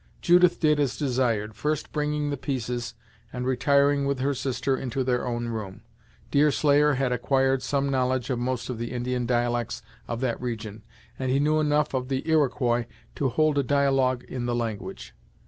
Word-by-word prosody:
Judith 180 0 +4
did 150 -2 +3
as 135 -4 0
desired, 120 -6 0
first 150 +6 -2
bringing 150 -1 -1
the - - -1
pieces, 125 -3 -3 0.4
and 125 0 -4
retiring 140 +2 +3
with 140 -1 0
her 135 +2 0
sister 135 +1 -1
into 130 0 -2
their 125 -1 0
own 120 -1 -2
room. 105 -4 -6 0.5
Deerslayer 145 0 +4
had 130 -1 0
acquired 135 +2 +1
some 140 0 0
knowledge 130 -1 0
of 125 - -1
most 125 -1 -2
of 125 -3 -5
the 120 +1 -4
Indian 125 0 -2
dialects 120 -2 -1 0.2
of 115 - -3
that 125 -2 -2
region, 110 -4 -5 0.4
and 130 -1 -1
he 135 +2 +2
knew 155 +2 +2
enough 150 -1 +1
of 130 -1 -1
the 135 +2 -3
Iroquois 125 -6 +2 0.3
to 135 - 0
hold 150 +3 +2
a - - +2
dialogue 135 -2 +2
in 125 -2 -5
the 120 - 0
language. 115 -4 -5
130 Hz, 175 wpm, -26 LUFS, 120-140 Hz, 0.5 s, Judith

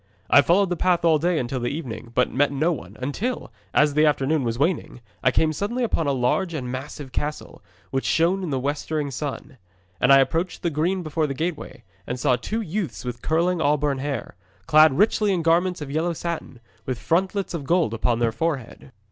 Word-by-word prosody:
'I 145 - +8
followed 185 +5 +3
the - - +1
path 175 0 +1
all 160 -2 +4
day 175 +2 +1
until 130 -1 -2
the 120 - -1
evening, 125 -6 -6
but 125 - +2
met 145 +2 +2
no 155 +5 +1
one, 105 - -9
until, 190 - -3 0.2
as 150 -1 +3
the 150 +1 +3
afternoon 145 0 +1
was 115 -1 -2
waning, 150 -2 -1 0.2
I - - +5
came 155 +4 +2
suddenly 230 - -2
upon 165 -9 0
a - - +2
large 140 +7 0
and 125 -4 -4
massive 135 +1 -7
castle, 150 +4 -4 0.3
which 135 0 -1
shone 175 +4 +2
in 180 - -3
the 135 - -1
westering 145 +1 -2
sun. 135 -1 -6 0.4
And - - +4
I 135 - +9
approached 165 +6 0
the 170 - 0
green 175 +5 0
before 155 0 -1
the 135 - -4
gateway, 160 +1 -4 0.2
and 125 +1 -3
saw 125 - +3
two 215 - -3
youths 170 - -4
with 120 -1 -5
curling 170 +2 +1
auburn 145 -2 +1
hair, 140 0 -4 0.3
clad 155 0 +6
richly 210 0 +3
in 175 -3 0
garments 175 +1 +2
of 140 -2 -6
yellow 165 +3 0
satin, 165 -7 -5 0.3
with 130 -2 -2
frontlets 190 - 0
of 155 -5 -4
gold 165 -6 +2
upon 115 +1 0
their 115 -1 +1
forehead. 140 -2 -4
150 Hz, 200 wpm, -24 LUFS, 135-170 Hz, 0.4 s, I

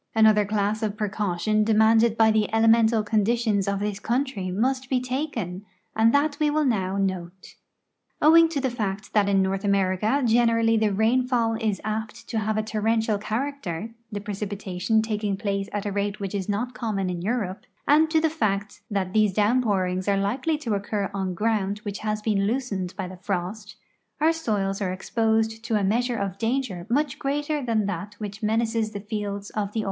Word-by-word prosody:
Another 215 -1 +5
class 210 +1 0
of 215 -1 -2
])recaution 210 0 0
demanded 220 +1 +4
b\" 220 -1 +5
the 215 -1 +1
elemental 225 0 +4
conditions 215 -1 +1
of 200 0 0
this 205 -1 -2
country 235 -5 -1
must 255 +7 -1
be 260 - +2
taken, 250 - -3 0.3
and 225 +1 +4
that 285 +1 +2
we 300 -1 +3
will 305 0 +1
now 195 -6 0
note. 185 -2 -3 0.7
Owing 330 +2 +6
to 310 -3 -2
the 260 -2 -1
fact 210 -4 -4
that 205 -2 +3
in 195 -1 +3
North 190 +1 -1
America 200 +6 +1
generall}^ 230 -1 +3
the 215 -1 +2
rain 225 +5 +2
fall 235 -3 +1
is 220 -3 -1
apt 220 +2 -4
to 225 - -1
have 215 0 -1
a 215 - +1
torrential 220 0 0
character 220 - -3 0.2
(the 205 -1 -4
])recipitation 205 0 -1
taking 210 -3 -2
■])lace 200 0 -2
at 205 -1 -3
a 205 - -1
rate 200 +1 -2
which 195 -1 -4
is 200 -1 -3
not 240 +5 -1
common 210 -6 -2
in 180 -1 -3
Europe) 205 -2 -2 0.2
and 310 +2 +5
to 320 0 +3
the 320 - +2
fact 205 -10 -2
that 195 -3 -2
these 215 -3 +3
downpourings 205 -4 +1
are 200 - +2
likely 250 +11 0
to 240 -8 -3
occur 200 0 -2
on 190 -2 -2
ground 205 -1 0
which 205 -2 -5
has 215 0 -2
been 200 -3 +1
loosened 210 -7 -2
by 190 -2 -3
the 185 0 -9
frost, 200 +3 -4 0.4
our 320 +2 +4
soils 205 -10 -1
are 185 -2 0
exposed 220 +3 0
to 230 -1 -1
a 205 - +1
meas 230 +6 +2
ure 240 - -1
of 195 -2 -3
danger 225 -7 -2
much 280 +2 0
greater 290 +1 -1
than 225 -4 +1
that 200 +1 -4
which 210 0 -7
menaces 225 0 0
the 205 - -4
fields 205 -1 -4
of 205 -1 -3
the. 225 - -1
215 Hz, 185 wpm, -25 LUFS, 200-230 Hz, 0.7 s, Owing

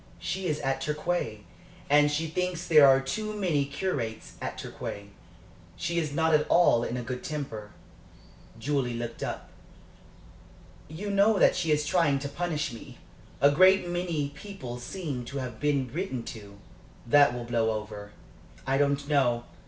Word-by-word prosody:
She 190 -1 -3
is 150 -2 -1
at 135 0 -1
Torquay, 150 -8 -2 0.5
and 145 +1 +5
she 150 +2 -1
thinks 175 +1 -2
there 150 -4 +7
are 135 0 +6
too 215 +11 -3
many 170 -9 +1
curates 140 -7 -3
at - - -4
Torquay. 100 0 -7 0.7
She 170 0 -1
is 155 -3 -2
not 160 +2 +2
at 150 0 +3
all 145 -9 +5
in 120 - -3
a 125 - -4
good 125 +2 -5
temper." 125 -9 -5 0.9
Julie 130 -1 -1
looked 115 0 -5
up. - - -5 1.4
"You 185 +7 -5
know 200 +2 +4
that - - +5
she 165 -3 0
is 150 0 +2
trying 155 -3 +2
to 140 +1 -4
punish 155 -1 -2
me. 115 - -11 0.4
A 140 - +6
great 185 +4 +5
many 175 -5 -2
people 140 -6 -8
seem 140 -1 -5
to 140 +3 -6
have 125 -4 -5
been 145 -3 +1
written 165 -8 -3
to." 100 -3 -12 0.5
"That 140 +1 +5
will 120 - -4
blow 115 -1 +1
over." 105 -1 -5 0.5
"I 135 +1 +1
don't 140 0 +1
know. 125 -5 +2
145 Hz, 160 wpm, -28 LUFS, 125-170 Hz, 1.4 s, there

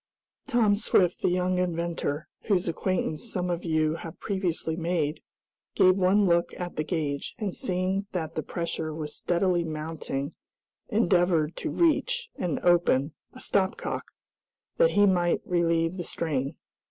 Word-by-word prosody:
Tom 235 -6 +3
Swift, 185 -4 +2
the - - +2
young 180 0 +1
inventor, 170 -4 -2 0.2
whose 190 -5 +2
acquaintance 175 +3 -1
some 180 -2 -1
of 170 0 -2
you 155 -1 +1
have 165 - -9
previously 180 -5 -2
made, 165 -2 -1 0.5
gave 185 0 +6
one 195 +2 +4
look 170 -1 +1
at 175 -1 -5
the 155 - -1
gauge, 150 -3 -3
and 205 -4 -3
seeing 190 -2 -1
that 165 -4 -3
the 155 - -2
pressure 160 -2 -3
was 150 -2 -5
steadily 175 0 +1
mounting, 155 -2 -4 0.6
endeavored 175 -7 +2
to 320 - -3
reach, 455 +10 +1
and 175 -5 -2
open, 170 -5 +3 0.2
a 255 - -11
stop 190 -5 +1
cock, - - -4 0.7
that - - +5
he 205 - +4
might 175 -3 +2
relieve 170 0 +1
the 175 - -3
strain. 150 -3 -2
175 Hz, 145 wpm, -27 LUFS, 160-190 Hz, 0.7 s, gave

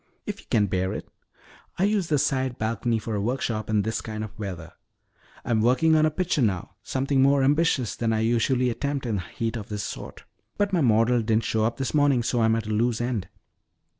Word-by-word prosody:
"If - - -5
you - - -17
can 105 -2 +3
bear 95 0 -1
it. - - -6 0.7
I 185 - +1
use 200 -3 +1
the 150 - +2
side 130 -2 0
balcony 115 +1 -1
for 110 0 -4
a 100 - -1
workshop 115 -1 -2
in 105 -2 +2
this 110 +2 -2
kind 110 -1 -5
of 110 - -6
weather. 90 -5 -6 0.7
I'm 110 -2 +1
working 130 +8 +4
on 155 0 +4
a - - +2
picture 175 -1 -1
now, 95 -7 0
something 135 +4 0
more 140 0 +4
ambitious 145 -4 +2
than 115 -1 -1
I 110 -1 +1
usually 120 +2 +2
attempt 140 +2 -3
in 110 -4 -1
heat 115 +6 -4
of 105 -3 -6
this 105 -1 -3
sort. - - -7 0.3
But 205 -1 0
my 175 - +3
model 115 -1 +3
didn't 110 0 +1
show 110 -1 +1
up 115 - -1
this 135 - -3
morning 145 -5 +3
so 120 0 0
I'm 110 0 +3
at 115 -1 -2
a 110 - -4
loose 115 +2 +1
end." 120 -5 -2
115 Hz, 215 wpm, -25 LUFS, 110-135 Hz, 0.7 s, working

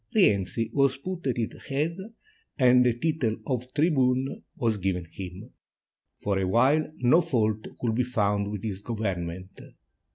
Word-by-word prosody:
Rienzi 115 - +2
was 140 -2 +3
put 175 +2 -5
at 125 - 0
its 115 -2 -4
head, 150 +5 -1 0.6
and 125 -2 +6
the 120 -2 +2
title 150 -6 0
of 125 -1 -3
"Tribune" 135 -4 +2 0.2
was 115 -3 0
given 90 -2 -1
him. 95 +6 -9 0.7
For 100 -1 +1
a 95 - 0
while 135 +10 +3
no 125 +8 +6
fault 110 -7 0
could 115 -2 0
be 125 +3 +1
found 105 -4 0
with 105 -2 -5
his 100 -3 -4
government. 95 -5 -4
115 Hz, 150 wpm, -27 LUFS, 100-135 Hz, 0.7 s, and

